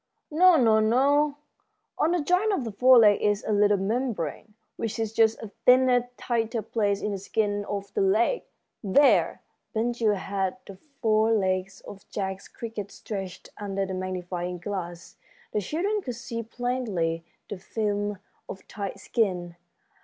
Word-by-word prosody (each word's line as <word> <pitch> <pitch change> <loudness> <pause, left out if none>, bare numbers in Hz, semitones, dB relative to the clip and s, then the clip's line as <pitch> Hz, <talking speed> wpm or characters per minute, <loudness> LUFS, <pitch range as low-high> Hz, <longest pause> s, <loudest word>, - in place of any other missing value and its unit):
"No, 355 +3 +6 0.2
no, 280 +6 +3 0.6
on 315 - +1
the 350 -4 0
joint 365 +7 +2
of 385 -10 0
the 225 - -4
fore 250 +5 +6
leg 210 -3 +6
is 205 -1 +1
a - - 0
little 205 0 +4
membrane, 210 - -3 0.2
which 225 - -3
is 225 -1 -2
just 225 0 +3
a 210 - -8 0.2
thinner, 250 -1 +5
tighter 230 -1 -1
place 205 -2 -1
in 210 - -1
the 200 - -3
skin 205 +1 -1
of 200 -1 -5
the - - 0
leg. 215 - +2 0.4
There!" 205 - +3 0.3
Ben 230 +2 +1
Gile 225 -3 +1
had 195 +2 -2
the 195 - -10 0.3
fore 220 -1 +3
leg 190 -2 +1 0.2
of 200 0 -11
Jack's 190 -1 -4
cricket 220 -4 -7
stretched 190 -4 -7
under 195 -1 -2
the 190 - -5
magnifying 180 -1 -4
glass. 175 -2 -6 0.3
The 210 - 0
children 385 - -1
could 250 -8 -5
see 235 0 -5
plainly 225 -9 -2 0.2
the 200 - -6
film 205 0 -2 0.3
of 190 - -9
tight 200 -2 -6
skin. 180 -6 -1
210 Hz, 155 wpm, -26 LUFS, 195-240 Hz, 0.6 s, No